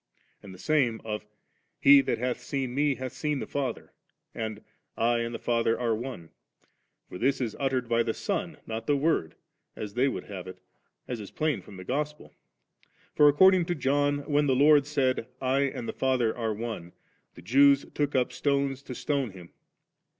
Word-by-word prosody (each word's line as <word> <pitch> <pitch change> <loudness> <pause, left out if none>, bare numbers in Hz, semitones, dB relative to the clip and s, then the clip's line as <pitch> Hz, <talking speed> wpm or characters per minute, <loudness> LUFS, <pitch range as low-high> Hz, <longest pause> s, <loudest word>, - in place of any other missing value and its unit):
And 100 - -11
the 95 - -11
same 120 +1 +1
of 105 -1 -4 0.5
*He 140 0 +8
that - - -1
hadi 125 +1 -2
seen 130 0 -3
Me, 145 0 +2
hath 130 -1 -5
seen 150 -1 -2
the - - -4
Father,' 135 -5 -4 0.4
and 110 -2 -5 0.2
* - - -52
I 120 +1 +2
and 115 0 -2
the 115 - -4
Father 115 -1 0
are 120 -2 0
On^' 115 -8 -7 0.8
for 90 - -9
this 135 +3 +1
is 115 -5 -2
ottered 130 -3 0
by 115 0 +2
the 115 -1 -1
Son, - - -3
not 110 0 -5
the 145 - +3
Word, 140 - 0 0.4
as 105 -2 -6
they 125 +3 +2
would 135 - -3
have 95 -3 -8
it, 95 - -9 0.5
as 125 -2 -4
is 105 - -8
plain 155 -2 -1
from 100 - -13
the 95 - -8
Gospel; 150 +7 -4 0.8
for 150 0 +6
according 185 +4 +5
to 175 - -1
John 145 +1 +1
when 145 0 +2
the 130 - +3
Lord 145 +1 +5
said, 130 -5 0
' 130 - -41
I 135 +2 +1
and 125 -3 -4
Ae - - -3
Father 130 -4 +1
are 115 -2 -2
One,' 110 -6 -6 0.4
the - - -13
Jews 140 +2 +5
took 145 -1 -1
up 125 -1 +1
stones 140 0 0
to 130 -2 -8
stone 135 +1 -1
Him. 90 -3 -13
130 Hz, 195 wpm, -28 LUFS, 115-140 Hz, 0.8 s, He